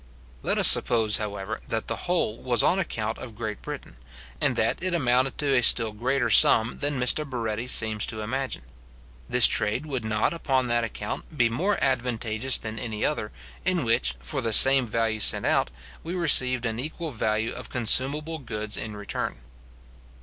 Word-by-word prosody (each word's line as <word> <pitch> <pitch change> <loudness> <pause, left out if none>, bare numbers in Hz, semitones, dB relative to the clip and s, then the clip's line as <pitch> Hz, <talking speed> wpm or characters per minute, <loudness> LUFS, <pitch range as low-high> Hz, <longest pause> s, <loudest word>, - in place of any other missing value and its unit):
Let - - +1
us - - +7
suppose, 110 -3 +5
however, 105 0 -5
that 110 -1 -3
the - - -2
whole 170 -11 -1
was 125 -2 +2
on 185 - +2
account 110 - -3
of 115 -4 -10
Great 110 -2 -5
Britain, - - -8 0.4
and - - +1
that - - 0
it 185 -1 -1
amounted 130 -3 +1
to 145 -2 0
a 125 - +3
still 115 -2 +4
greater 120 +2 -1
sum 110 +2 +4
than 145 -2 -2
Mr 125 +5 +2
Barretti 120 -4 -4
seems 110 -3 +2
to 110 - -5
imagine; 130 - -4 0.7
this 125 -1 +5
trade 110 +6 +1
would 135 -6 -4
not, 110 +6 0
upon 135 -6 0
that 120 0 +1
account, 115 +7 -6
be 120 -2 +3
more 185 - -1
advantageous 125 -2 0
than 110 0 -7
any 110 -2 -3
other, 110 -8 -2 0.3
in 180 -2 0
which, 65 - +1
for - - -4
the 115 -1 -2
same 135 +2 +6
value 110 0 -1
sent - - +1
out, - - +1 0.3
we 170 +3 -5
received 130 -7 +3
an 115 0 -3
equal 155 +3 -5
value 110 -1 -1
of - - -9
consumable 140 +7 +1
goods 110 -5 -5
in 110 -1 -6
return. 105 -1 -5
120 Hz, 175 wpm, -25 LUFS, 110-135 Hz, 0.7 s, us